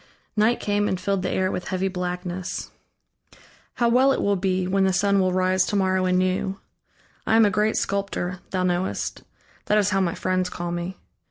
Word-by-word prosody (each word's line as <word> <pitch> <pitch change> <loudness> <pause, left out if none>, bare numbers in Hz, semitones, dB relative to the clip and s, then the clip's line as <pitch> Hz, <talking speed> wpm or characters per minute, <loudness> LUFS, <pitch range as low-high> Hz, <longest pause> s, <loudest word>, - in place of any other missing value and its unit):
Night 220 +3 +3
came, 205 0 0
and 185 - -1
filled 195 +1 -1
the 185 - -2
air 185 0 0
with 180 - -4
heavy 190 0 -1
blackness. 180 -1 -4 1.0
"How 240 - +2
well 255 +3 +4
it - - 0
will 200 0 +2
be, 185 -1 0
when 195 +1 +2
the 190 0 +2
sun 200 +1 +2
will 185 -1 +2
rise 185 0 +2
to - - -1
morrow 190 -1 +2
anew.... 185 +1 0 0.7
I 220 - +3
am 225 -1 +6
a 205 - +2
great 210 +2 +1
sculptor, 195 -2 -2
thou 185 -1 -1
knowest; 180 +1 -1 0.4
that 210 - +2
is 205 -1 +2
how 195 +1 +2
my 175 -3 0
friends 185 0 0
call 175 -1 -4
me. 175 +2 -4
185 Hz, 190 wpm, -24 LUFS, 185-200 Hz, 1.0 s, am